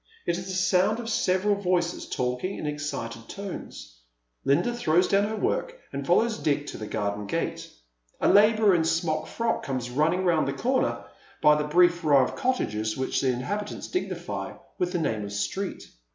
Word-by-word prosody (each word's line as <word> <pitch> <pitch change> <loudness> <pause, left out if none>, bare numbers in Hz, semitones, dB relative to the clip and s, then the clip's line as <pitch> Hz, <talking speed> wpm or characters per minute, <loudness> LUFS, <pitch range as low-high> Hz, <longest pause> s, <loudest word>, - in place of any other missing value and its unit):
It 170 - +1
is 185 - -7
the 190 - -3
sound 185 +4 +2
of 230 -1 -4
several 190 0 +2
voices 180 -3 -1
talking 125 +10 -2
in - - -5
excited 130 -6 -4
tones. 185 - -8 0.4
Linda 190 - +2
throws 180 -6 +2
do^vn 200 +1 +3
her 220 - -3
work - - -1 0.2
and - - -4
follows 230 -1 +3
Dick 145 -2 0
to - - -7
the 110 - -5
garden 105 -1 -2
gate. - - -3 0.5
A - - +2
labourer 215 0 +5
in 170 - +3
a - - +1
smock 165 -1 0
frock 230 0 -1
comes 130 -3 -3
running 165 +8 +1
round 165 -5 +2
the 135 - -1
corner, 255 - 0 0.3
by 150 - +6
the 150 0 0
brief 175 +2 +4
row 145 -4 +5
of - - -3
cottages 110 - -1
which 130 - 0
the 135 - +1
inhabi 200 +12 -1
tants - - -7
dignify 365 - -3 0.3
with 180 -1 0
the 180 - 0
name 110 -10 -1
of 100 0 -6
street. 190 - -3
170 Hz, 185 wpm, -26 LUFS, 135-200 Hz, 0.5 s, by